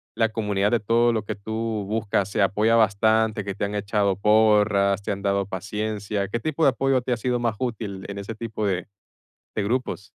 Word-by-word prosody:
la 115 Hz, -1 st, +2 dB
comunidad 105 Hz, -2 st, 0 dB
de 120 Hz, -, +2 dB
todo 115 Hz, +3 st, +3 dB
lo 110 Hz, -2 st, -1 dB
que -, -, -3 dB
tú 110 Hz, 0 st, -3 dB
buscas, 105 Hz, -2 st, 0 dB
se 100 Hz, 0 st, +1 dB
apoya 105 Hz, +4 st, +2 dB
bastante, 110 Hz, 0 st, +2 dB
que 100 Hz, -1 st, -5 dB
te 100 Hz, -, -1 dB
han 100 Hz, -, -4 dB
echado 100 Hz, -1 st, 0 dB
porras, 105 Hz, -1 st, +3 dB
te -, -, -3 dB
han 100 Hz, 0 st, -4 dB
dado 100 Hz, -1 st, +1 dB
paciencia? 105 Hz, +1 st, -3 dB
¿Qué 115 Hz, +4 st, -3 dB
tipo 155 Hz, +4 st, -2 dB
de -, -, +7 dB
apoyo 135 Hz, 0 st, +1 dB
te 125 Hz, 0 st, -1 dB
ha -, -, -1 dB
sido 125 Hz, +1 st, -1 dB
más 115 Hz, -3 st, 0 dB
útil 110 Hz, -6 st, -4 dB
en 100 Hz, 0 st, -6 dB
ese 105 Hz, +3 st, -6 dB
tipo 110 Hz, -2 st, -3 dB
de 95 Hz, 0 st, -2 dB, 0.7 s
de 105 Hz, -, -1 dB
grupos? 115 Hz, -3 st, -2 dB
105 Hz, 205 wpm, -24 LUFS, 100-115 Hz, 0.7 s, de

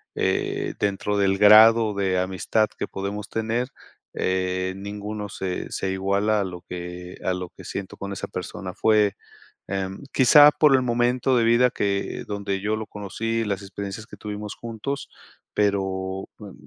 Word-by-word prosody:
eh, -, -, -1 dB
dentro 105 Hz, 0 st, 0 dB
del 95 Hz, -1 st, +2 dB
grado 110 Hz, +1 st, +7 dB
de 95 Hz, -2 st, +1 dB
amistad 95 Hz, +4 st, +1 dB
que -, -, -3 dB
podemos 100 Hz, +2 st, -5 dB
tener, 115 Hz, +3 st, -1 dB, 0.4 s
eh, 95 Hz, 0 st, -1 dB
ninguno 105 Hz, +1 st, -5 dB
se 95 Hz, -1 st, -4 dB
se 95 Hz, -, -2 dB
iguala 100 Hz, +3 st, +1 dB
a -, -, +1 dB
lo 90 Hz, -2 st, -6 dB
que 90 Hz, 0 st, -7 dB
a 95 Hz, -, +1 dB
lo 90 Hz, -1 st, -5 dB
que -, -, -14 dB
siento 100 Hz, -1 st, -6 dB
con 100 Hz, 0 st, -6 dB
esa 100 Hz, -, -5 dB
persona. 90 Hz, +1 st, -6 dB
Fue, 105 Hz, 0 st, +3 dB, 0.5 s
em, 95 Hz, +2 st, -4 dB
quizá 145 Hz, +3 st, +8 dB
por 150 Hz, -3 st, +4 dB
el 130 Hz, -, +1 dB
momento 125 Hz, +1 st, +2 dB
de 120 Hz, -, +3 dB
vida, 120 Hz, +2 st, +4 dB
que 100 Hz, -3 st, -2 dB
donde 100 Hz, -2 st, -2 dB
yo 105 Hz, +2 st, 0 dB
lo 110 Hz, 0 st, -5 dB
conocí, 115 Hz, +3 st, -3 dB
las 100 Hz, -1 st, -2 dB
experiencias 100 Hz, +2 st, -6 dB
que -, -, -12 dB
tuvimos 105 Hz, 0 st, -6 dB
juntos, 120 Hz, +5 st, -5 dB, 0.5 s
pero, 95 Hz, -2 st, -1 dB
mm, 100 Hz, -2 st, -10 dB
100 Hz, 160 wpm, -24 LUFS, 95-110 Hz, 0.5 s, quizá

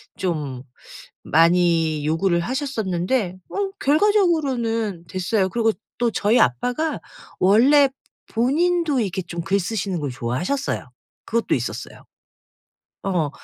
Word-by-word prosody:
좀 150 Hz, -8 st, -3 dB, 0.6 s
많이 165 Hz, -2 st, +3 dB
요구를 170 Hz, +3 st, +1 dB
하셨었는데 215 Hz, -, -1 dB
어 400 Hz, -1 st, -2 dB
결과적으로는 275 Hz, -, +1 dB
됐어요. 190 Hz, +1 st, 0 dB
그리고 225 Hz, +2 st, +1 dB, 0.2 s
또 240 Hz, -1 st, +1 dB
저희 215 Hz, +3 st, +2 dB
아빠가 245 Hz, -, 0 dB, 0.4 s
원래 265 Hz, +9 st, +5 dB, 0.4 s
본인도 300 Hz, +4 st, +1 dB
이렇게 190 Hz, -3 st, -2 dB
좀 170 Hz, -1 st, -6 dB
글 195 Hz, +3 st, +1 dB
쓰시는 195 Hz, -2 st, -2 dB
걸 145 Hz, -2 st, -3 dB
좋아하셨어요. 125 Hz, -, -2 dB, 0.4 s
그것도 230 Hz, +1 st, 0 dB
있었어요. -, -, -6 dB, 1.0 s
어. 175 Hz, -6 st, 0 dB
200 Hz, 260 characters per minute, -22 LUFS, 170-265 Hz, 1.0 s, 원래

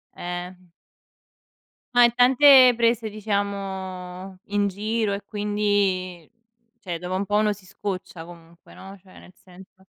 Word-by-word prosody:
Eh. 175 Hz, +1 st, -6 dB, 1.4 s
Ma 245 Hz, 0 st, +6 dB
in 235 Hz, 0 st, +4 dB
tante 255 Hz, +1 st, +6 dB
prese, 230 Hz, -1 st, +1 dB
diciamo, 195 Hz, -3 st, -5 dB
in 205 Hz, 0 st, 0 dB
giro 210 Hz, +2 st, -2 dB
e 200 Hz, -, -5 dB
quindi 205 Hz, -5 st, -2 dB, 0.5 s
cioè 175 Hz, -7 st, -6 dB
dopo 180 Hz, +1 st, -5 dB
un 200 Hz, +1 st, -2 dB
po' 205 Hz, -, -2 dB
uno 210 Hz, 0 st, +2 dB
si 195 Hz, -2 st, -17 dB
scoccia 185 Hz, -3 st, -7 dB
comunque, 170 Hz, -1 st, -16 dB
no, 195 Hz, +1 st, -12 dB
cioè 185 Hz, -1 st, -19 dB
nel 180 Hz, -, -17 dB
senso. 190 Hz, +1 st, -19 dB
200 Hz, 130 wpm, -23 LUFS, 185-210 Hz, 1.4 s, Ma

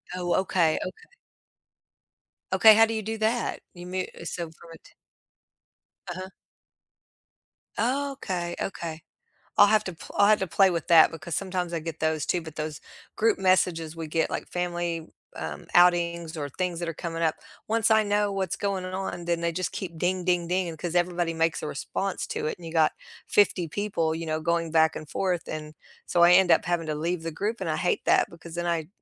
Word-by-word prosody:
Oh, 175 Hz, -1 st, 0 dB
okay. 170 Hz, -4 st, +2 dB
Okay. 450 Hz, -, -7 dB, 1.4 s
Okay. 220 Hz, -1 st, +8 dB
How 225 Hz, +1 st, +7 dB
do 225 Hz, -, -3 dB
you 220 Hz, -, -2 dB
do 220 Hz, +1 st, -4 dB
that? 225 Hz, +2 st, 0 dB
You 175 Hz, 0 st, -10 dB
mute 185 Hz, 0 st, -3 dB
eh, -, -, -11 dB
so 175 Hz, -, -3 dB
from 165 Hz, +1 st, -16 dB
a -, -, -11 dB
t -, -, -20 dB, 1.2 s
Uh-huh. 185 Hz, +2 st, -6 dB, 1.5 s
Okay. 240 Hz, -9 st, -1 dB
Okay. 165 Hz, -4 st, -4 dB, 0.6 s
I'll 205 Hz, -, +8 dB
have 215 Hz, 0 st, +3 dB
to 185 Hz, -, -4 dB
pl 165 Hz, -, -12 dB
I'll 200 Hz, -, +6 dB
have 215 Hz, 0 st, +5 dB
to 190 Hz, -, 0 dB
play 190 Hz, +2 st, +4 dB
with 170 Hz, -1 st, -3 dB
that 165 Hz, -2 st, +7 dB
because 165 Hz, 0 st, -6 dB
sometimes 185 Hz, -2 st, -2 dB
I 170 Hz, -, -1 dB
get 160 Hz, 0 st, -6 dB
those 155 Hz, -1 st, 0 dB
too, 180 Hz, -, +1 dB
but 160 Hz, -1 st, -10 dB
those 155 Hz, -1 st, -4 dB, 0.3 s
group 225 Hz, 0 st, +2 dB
messages 180 Hz, -4 st, +2 dB
we 165 Hz, -1 st, -5 dB
get, 165 Hz, +1 st, 0 dB
like -, -, -4 dB
family, 175 Hz, -2 st, -2 dB, 0.3 s
um, -, -, -6 dB
outings 170 Hz, -2 st, +3 dB
or 145 Hz, -2 st, -3 dB
things 180 Hz, +4 st, -3 dB
that 170 Hz, -, -3 dB
are 165 Hz, -, -3 dB
coming 165 Hz, 0 st, -4 dB
up. 160 Hz, -1 st, +2 dB, 0.3 s
Once 225 Hz, 0 st, +2 dB
I 220 Hz, 0 st, +6 dB
know 205 Hz, 0 st, +1 dB
what's 190 Hz, -1 st, -2 dB
going 195 Hz, -2 st, -2 dB
on, 185 Hz, -1 st, -4 dB
then 170 Hz, -1 st, 0 dB
they 170 Hz, 0 st, 0 dB
just 185 Hz, +1 st, -2 dB
keep 190 Hz, -4 st, -6 dB
ding, 180 Hz, +1 st, 0 dB
ding, 175 Hz, -1 st, +1 dB
ding 180 Hz, -1 st, 0 dB
because 170 Hz, +2 st, -5 dB
everybody 175 Hz, -1 st, +1 dB
makes 165 Hz, 0 st, +1 dB
a -, -, -3 dB
response 195 Hz, +7 st, -3 dB
to -, -, -3 dB
it, -, -, -2 dB
and 175 Hz, -, -13 dB
you 160 Hz, -, -7 dB
got 160 Hz, -2 st, +3 dB, 0.3 s
50 185 Hz, -4 st, +3 dB
people, 165 Hz, -3 st, -1 dB
you 165 Hz, 0 st, -5 dB
know, 155 Hz, 0 st, -1 dB
going 170 Hz, 0 st, 0 dB
back 160 Hz, -1 st, +4 dB
and 155 Hz, -, -7 dB
forth. 180 Hz, -3 st, -1 dB
And 155 Hz, 0 st, -6 dB, 0.3 s
so 175 Hz, -, +2 dB
I 175 Hz, +1 st, +8 dB
end 185 Hz, 0 st, +6 dB
up -, -, +5 dB
having 170 Hz, 0 st, -1 dB
to 155 Hz, -, -2 dB
leave 165 Hz, +2 st, -2 dB
the 165 Hz, -, -3 dB
group 210 Hz, +8 st, -3 dB
and 180 Hz, -4 st, -2 dB
I 155 Hz, -, 0 dB
hate 180 Hz, -, 0 dB
that -, -, +4 dB
because 170 Hz, -1 st, -11 dB
then 175 Hz, 0 st, -2 dB
I 165 Hz, -2 st, -1 dB
175 Hz, 205 wpm, -26 LUFS, 165-190 Hz, 1.5 s, Okay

